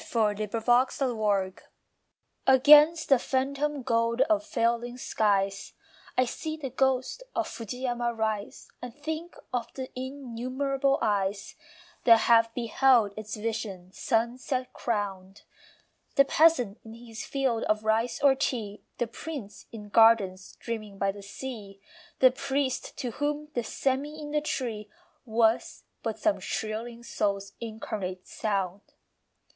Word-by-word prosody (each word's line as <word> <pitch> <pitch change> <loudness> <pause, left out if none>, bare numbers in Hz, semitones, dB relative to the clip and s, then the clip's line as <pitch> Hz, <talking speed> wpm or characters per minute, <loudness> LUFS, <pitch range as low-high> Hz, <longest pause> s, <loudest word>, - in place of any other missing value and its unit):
FAR 220 -3 +1
FUJIYAMA 215 -2 +1 0.9
Against 295 +5 +7
the 270 -3 +6
phantom 275 +2 -1
gold 230 0 +1
of 310 +2 +3
failing 240 -4 -1
skies 200 -4 0 0.4
I 255 - +4
see 310 +6 -5
the 275 -4 -5
ghost 265 - 0
of - - 0
Fujiyama 240 +1 -3
rise 220 -2 -3
And 250 -1 -7
think 315 +3 -5 0.2
of 245 -2 -2
the 260 -1 -6
innumerable 265 +1 -1
eyes 200 -1 0 0.5
That 230 -2 +7
have 230 -1 +5
beheld 235 -3 +3
its 215 0 -6
vision 210 -4 -4
sunset 250 +3 -1
crowned. 200 -4 -3 0.7
The 275 - +6
peasant 270 -9 +3
in 225 0 -11
his 230 -1 -9
field 265 -5 0
of 215 0 +1
rice 220 +2 +1
or 280 -1 +7
tea, 230 -6 -3 0.2
The 240 - 0
prince 235 -3 -8
in 210 -2 -9
gardens 205 -4 +4
dreaming 215 -4 -5
by 195 0 +1
the 200 +1 -11
sea, 200 -1 -8 0.4
The 255 -1 +8
priest 265 0 -2
to 245 - -3
whom 295 +4 -2
the 240 - 0
sêmi 275 +6 -2
in 295 -1 -7
the 300 0 +1
tree 230 -8 -3 0.4
Was 225 0 +1 0.2
but - - -3
some 320 -2 +1
shrilling 230 +2 -4
soul's 200 -3 -2
incarnate 210 -5 -5
sound. 195 -3 -2
235 Hz, 125 wpm, -28 LUFS, 215-265 Hz, 0.9 s, The